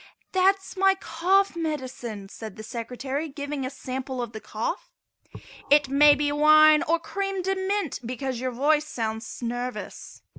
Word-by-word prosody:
"That 380 +1 +4
is - - -10
my 385 0 +4
cough 380 +2 +1
medicine," 260 -10 -4
said 215 0 -9
the 215 - -9
Secretary, 250 +6 -4
giving 285 0 -5
a 255 - -2
sample 260 -1 -5
of 240 -2 -3
the 220 - -7
cough. 345 - -4 0.8
"It 290 -1 +5
may 290 +1 +6
be 290 0 0
wine 305 +1 +6
or 335 0 +2
cream 390 +1 -3
de 385 +1 +1
mint 385 -4 -2
because 255 +1 -4
your 255 +1 -2
voice 295 +5 +1
sounds 225 -3 -4
nervous." 245 +1 -5
285 Hz, 155 wpm, -25 LUFS, 245-330 Hz, 0.8 s, may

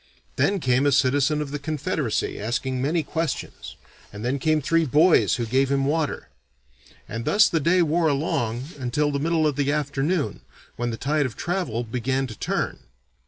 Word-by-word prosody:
Then 200 -1 +1
came 130 -1 +2
a - - +4
citizen 140 +3 +2
of 140 - -9
the 145 - -3
Confederacy 150 - -2
asking 125 +4 -2
many 155 +4 0
questions, 165 +2 -4 0.4
and 105 +3 -7
then 135 +3 0
came 155 +2 +2
three 165 +3 +2
boys 155 +4 +4
who 120 - -2
gave 130 +4 +1
him 135 0 +1
water. 150 +1 -1 0.8
And 115 +1 -5
thus 205 - +5
the 165 - 0
day 170 +4 +3
wore 165 +1 +2
along 135 -3 -1
until 140 +4 0
the 140 - -1
middle 160 +1 +1
of 150 -3 0
the 145 0 +1
afternoon 145 +2 -1 0.3
when 120 0 -2
the 115 - -4
tide 145 +1 0
of 120 - -11
travel 170 - -2
began 130 +3 -1
to 115 -4 -8
turn. - - -2
140 Hz, 175 wpm, -24 LUFS, 130-155 Hz, 0.8 s, thus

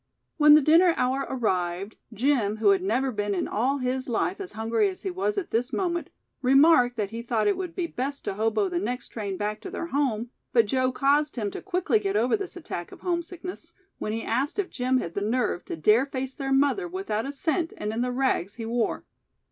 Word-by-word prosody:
When 300 -1 +8
the 305 - +5
dinner 335 +3 +5
hour 265 +2 0
arrived, 190 -5 -1 0.2
Jim, 225 -2 +1
who 215 -2 +3
had 195 -2 +4
never 245 +8 0
been 205 -2 -1
in 180 - -1
all 260 +6 0
his 255 0 -2
life 365 - -1
as 380 - -7
hungry 225 - +1
as 370 - -9
he 380 - -2
was 390 +3 -1
at 390 - -3
this 240 +3 0
moment, 345 -3 -1 0.3
remarked 260 -2 +5
that 205 -2 -2
he 230 +1 -5
thought 235 -2 0
it 405 - +3
would 360 -3 -5
be 360 - -1
best 280 -2 -4
to - - -1
hobo 215 0 +1
the 175 -2 -1
next 245 +6 -4
train 200 -4 -4
back 210 +1 -3
to 380 - -7
their 370 -2 -4
home, 255 -7 -1 0.2
but 230 -2 +5
Joe 255 +4 +1
caused 290 +3 +2
him 210 -5 -2
to - - -6
quickly 355 - +1
get 195 -1 -2
over 235 +4 +3
this 395 -4 -5
attack 175 - -6
of - - -13
homesickness, 355 +1 -4 0.3
when 215 - -3
he 225 +1 -3
asked 280 +7 -1
if 405 -3 -2
Jim 255 +1 +1
had 170 -9 -3
the 200 - -2
nerve 220 -4 0
to - - -4
dare 215 - +3
face 265 -1 -4
their 270 0 -4
mother 285 +7 +2
without 340 - -3
a - - -3
cent 320 +4 -1
and 210 +1 -3
in 230 - -1
the 250 0 0
rags 245 -7 0
he 230 - -6
wore. 230 0 -1
255 Hz, 225 wpm, -26 LUFS, 215-310 Hz, 0.3 s, When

